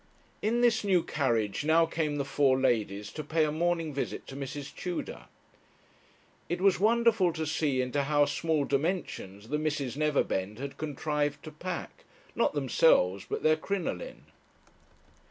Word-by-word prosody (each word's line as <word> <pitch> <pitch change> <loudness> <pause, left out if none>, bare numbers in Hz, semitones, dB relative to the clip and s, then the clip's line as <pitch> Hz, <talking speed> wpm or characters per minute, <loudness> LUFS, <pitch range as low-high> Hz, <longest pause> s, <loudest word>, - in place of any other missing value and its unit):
In 230 +3 +1
this 235 -3 +3
new 185 -4 +3
carriage 115 -8 0
now 160 +2 +4
came 160 -2 -2
the 140 -1 -1
four 135 -2 +2
ladies 105 -5 0
to 155 - -6
pay 155 +2 +1
a 150 - -1
morning 165 -1 0
visit 140 - -4
to 135 - -9
Mrs. 140 +1 -6
Tudor. 180 -1 -5 1.2
It 175 - -1
was 195 -1 +3
wonderful 220 -3 +3
to 160 0 -3
see 145 -4 0
into 140 +2 -1
how 145 0 +3
small 155 0 0
dimensions 135 - -2
the 150 +1 0
Misses 145 -5 -2
Neverbend 135 -9 0
had 140 +2 -6
contrived 150 -1 -2
to 155 - -8
pack, 175 +3 -6 0.3
not - - +1
themselves, 125 - +3
but - - -3
their 155 0 +5
crinoline. 200 - -4
150 Hz, 150 wpm, -29 LUFS, 135-165 Hz, 1.2 s, their